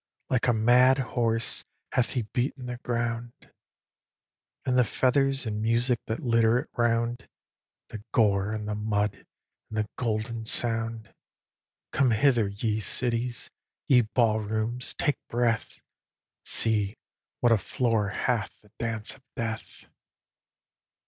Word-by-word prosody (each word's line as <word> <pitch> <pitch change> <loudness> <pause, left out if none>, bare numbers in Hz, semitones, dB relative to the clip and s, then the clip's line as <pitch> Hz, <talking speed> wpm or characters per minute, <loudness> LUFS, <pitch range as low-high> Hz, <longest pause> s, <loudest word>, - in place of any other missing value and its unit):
Like 125 -1 +2
a 120 - +4
mad 125 +4 +5 0.2
horse 115 -2 +1 0.3
hath 125 - +1
he 125 - 0
beaten 125 +4 -2
the 125 -1 -4
ground, 120 -1 -2 1.3
And 130 - +1
the 125 - +6
feathers 135 +2 +1
and 105 -1 -2
music 120 +2 +2
that 110 - -3
litter 115 -1 +4
it - - -4
round, 120 0 0 0.6
The 105 -2 -8
gore, 100 -2 +3
and 105 -1 -4
the 105 - -1
mud, 105 -1 -1 0.4
and 110 - -6
the 105 -1 0
golden 115 -1 -2
sound. 115 -1 0 0.8
Come 135 -2 +3
hither, 115 -1 +3
ye 105 +2 -1
cities! 120 +2 -1 0.4
ye 125 -2 +6
ball 110 -1 +2
rooms, 110 +3 -2
take 145 -3 0
breath! 115 -2 0 0.6
See 105 -2 +1 0.4
what 120 - +3
a 115 - +6
floor 110 0 0
hath 110 +2 -1
the 105 - -24
dance 115 -2 -2
of 135 - -21
death! 115 -1 -5
115 Hz, 130 wpm, -27 LUFS, 110-120 Hz, 1.3 s, the